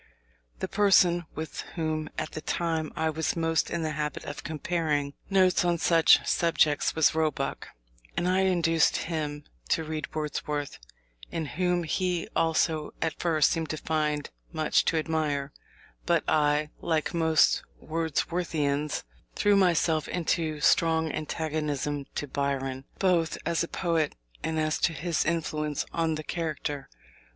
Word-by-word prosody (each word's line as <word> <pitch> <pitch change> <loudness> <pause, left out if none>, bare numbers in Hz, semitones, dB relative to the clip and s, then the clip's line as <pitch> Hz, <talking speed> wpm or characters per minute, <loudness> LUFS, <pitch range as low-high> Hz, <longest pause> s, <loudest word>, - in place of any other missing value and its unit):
The - - -1
person 180 -4 +4
with 160 0 -5
whom 155 -2 -2
at 155 - -3
that 155 - -8
time 160 -2 -1
I 160 0 0
was 155 0 -1
most 165 -1 +1
in 170 -1 -2
the 155 - -1
habit 150 -1 -3
of 145 - -6
comparing 150 -2 -1 0.2
notes 185 -2 +4
on 175 -1 +2
such 165 0 +5
subjects 160 -4 +2
was 160 -2 +4
Roebuck, 155 -3 -1 0.5
and 175 - +1
I 185 +1 +3
induced 170 -4 +3
him 150 -3 -3 0.3
to 160 - +2
read 155 0 -5
Wordsworth, 150 -1 -3 0.5
in 160 - -2
whom 180 +3 0
he 180 +1 -1
also 160 -1 +1
at 160 - -2
first 160 -4 +3
seemed 160 -2 -1
to 155 - -2
find 150 -2 -1 0.2
much 155 -2 +2
to 165 - +2
admire: 150 -3 -1 0.5
but - - +3
I, 150 0 +2
like 160 -3 -1
most 160 -2 +4 0.2
Wordsworthians, 155 -2 -1 0.3
threw 205 0 +3
myself 170 -4 +3
into 160 -3 -1
strong 160 0 +3
antagonism 150 -2 -2
to - - -2
Byron, 135 -1 -2
both 170 -5 +2
as 170 +1 +1
a - - -3
poet 165 -4 0 0.3
and 160 +1 -1
as 155 0 0
to 170 - +2
his 165 +2 -1
influence 150 -3 -1
on 165 -1 +1
the 155 - -5
character. 150 -4 -3
160 Hz, 140 wpm, -28 LUFS, 150-165 Hz, 0.5 s, such